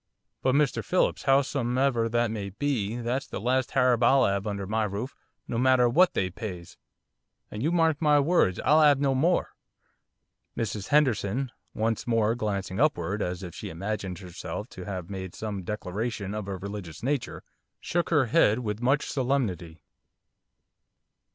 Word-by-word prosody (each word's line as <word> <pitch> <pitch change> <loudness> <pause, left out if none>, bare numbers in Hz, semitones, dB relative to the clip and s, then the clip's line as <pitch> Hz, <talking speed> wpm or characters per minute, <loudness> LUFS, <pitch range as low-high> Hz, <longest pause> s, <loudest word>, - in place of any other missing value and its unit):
But, 130 0 +2
Mr 145 -2 +2
Phillips, 185 - 0
howsomever 130 -3 +2
that 120 -1 +1
may 100 -3 -4
be, 115 -1 -2
that's 120 +3 -2
the - - -5
last 130 +3 0
Harab 125 -3 +3
I'll 135 +3 +5
'ave 100 +1 0
under 100 -1 -4
my 110 +3 0
roof, 105 +6 -4 0.3
no 115 - -2
matter 130 -1 +4
what 175 +9 +4
they 95 -1 0
pays, 90 -3 -7 0.8
and 105 - -5
you 155 +6 +1
may 175 - +1
mark 160 -2 +2
my 150 -2 +5
words 140 - +2
I'll 155 +2 +5
'ave 145 -3 +5
no 140 -1 +2
more.' 165 +7 +2 1.1
Mrs 105 -3 -3
Henderson, 130 -3 +1 0.2
once 115 +2 -1
more 115 -2 +2
glancing 100 -4 -3
upward, 100 - +1
as 90 0 -3
if 90 -2 -7
she - - -7
imagined 95 +1 -4
herself 95 +5 -7
to 90 - -9
have 95 -3 -5
made 95 -2 -6
some 105 -3 -4
declaration 105 +2 -4
of 105 -2 -4
a 95 -1 -4
religious 100 -3 -7
nature, 140 0 -2 0.4
shook 175 0 -1
her 150 -5 +3
head 110 -1 +3
with 110 -3 -4
much 135 +4 +2
solemnity. 100 - -2
115 Hz, 160 wpm, -27 LUFS, 100-135 Hz, 1.1 s, I'll